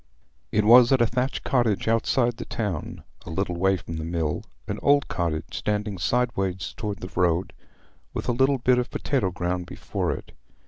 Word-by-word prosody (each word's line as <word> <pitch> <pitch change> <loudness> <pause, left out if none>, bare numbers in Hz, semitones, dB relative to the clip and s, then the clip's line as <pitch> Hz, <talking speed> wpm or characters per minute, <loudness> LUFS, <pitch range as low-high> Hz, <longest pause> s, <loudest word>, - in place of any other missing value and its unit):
It 105 0 +2
was 120 +2 +8
at 135 - +5
a 120 - +5
thatched 125 +3 -1
cottage 115 -7 +1
outside 120 +1 +2
the - - -6
town, 100 -9 -4 0.2
a - - -9
little 90 +1 -2
way 95 +2 +2
from 80 -2 -7
the 80 - -4
mill—an 80 -7 -4
old 140 -1 +4
cottage, 85 -2 -2
standing 105 -2 -2
sideways 95 -4 -1
towards 105 -3 -4
the 90 0 -3
road, 90 +1 +1 0.6
with - - -4
a - - +3
little 135 +3 +3
bit 125 0 +3
of 125 - -2
potato 130 -10 0
ground 90 0 -3
before - - -3
it. - - -6
105 Hz, 175 wpm, -25 LUFS, 90-120 Hz, 0.6 s, was